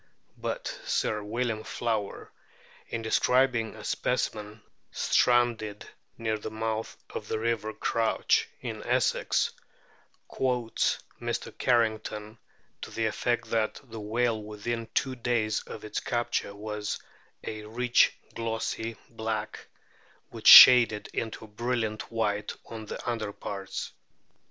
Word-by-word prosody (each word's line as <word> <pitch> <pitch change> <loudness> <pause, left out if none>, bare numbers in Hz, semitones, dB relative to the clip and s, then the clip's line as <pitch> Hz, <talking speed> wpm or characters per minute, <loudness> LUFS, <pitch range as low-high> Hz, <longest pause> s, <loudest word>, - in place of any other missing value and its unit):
But - - -4
Sir 110 - 0
William 110 +1 -2
Flower, 110 -4 -3 0.6
in 115 -1 -4
de 110 - -3
scribing 125 -3 +2
a - - -10
specimen 105 +1 -2 0.3
stranded 120 -4 +2 0.3
near 110 -1 -1
the 110 - -5
mouth 110 0 -3
of - - -6
the - - -1
river 110 -1 -1
Crouch, 110 +1 +1
in - - -5
Essex, - - +1 0.8
quotes 125 -3 0 0.2
Mr. - - -3
Carrington 110 -2 0 0.4
to - - -6
the 115 - -2
effect 120 +2 -1
that 110 -1 0
the 115 -4 -9
whale 110 +1 0
within 110 +2 -4
two 135 -2 +1
days 115 -3 0
of 110 - -8
its 105 - -3
capture 120 -4 -2
was 105 0 -4 0.5
"a 110 -1 -6
rich 120 +2 +3 0.2
glossy 115 0 -3
black, 110 -2 -4 0.6
which - - -4
shaded 120 -4 +10
into 110 -1 -4
a - - -14
brilliant 110 0 -2
white 105 -2 -1
on 110 -2 -8
the - - -7
underparts." 100 -3 -4
110 Hz, 120 wpm, -28 LUFS, 110-120 Hz, 0.8 s, shaded